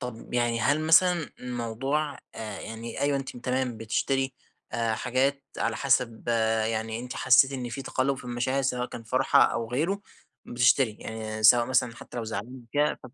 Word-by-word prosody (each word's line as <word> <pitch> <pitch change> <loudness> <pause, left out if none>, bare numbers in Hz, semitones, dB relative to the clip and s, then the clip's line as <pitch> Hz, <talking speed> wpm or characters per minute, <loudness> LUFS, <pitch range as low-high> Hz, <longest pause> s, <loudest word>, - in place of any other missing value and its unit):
طب 125 -1 -7
يعني 120 -1 +1
هل 145 +6 +2
مثلًا 165 0 +4
الموضوع 125 +5 -2 0.2
آآ 105 -3 -6
يعني 115 +1 -7
أيوه 140 0 +2
أنتِ 135 - -7
م - - -7
تمام 125 -1 -1
بتشتري 135 +5 -1 0.4
آآ 115 -1 0
حاجات 135 +4 0
على - - 0
حسب 125 -4 0 0.4
يعني 110 0 -2
أنتِ 125 +1 -7
حسيتِ 130 +1 +5
إن 125 -3 -4
في 130 +3 -5
تقلب 135 +1 0
في 130 - -11
المشاعر 125 +3 -1
سواء 125 -1 -1
كان 115 - -8
فرحة 120 +3 +3
أو 115 0 -1
غيره 165 +11 0 0.5
بتشتري، 120 -1 +3
يعني 110 -1 -5
سواء 120 +2 +7
مثلًا 120 -2 +1
حتى 125 - -11
لو 120 - -2
زعلانه 115 +4 -6
كده. 150 +1 +1
125 Hz, 170 wpm, -27 LUFS, 115-135 Hz, 0.5 s, سواء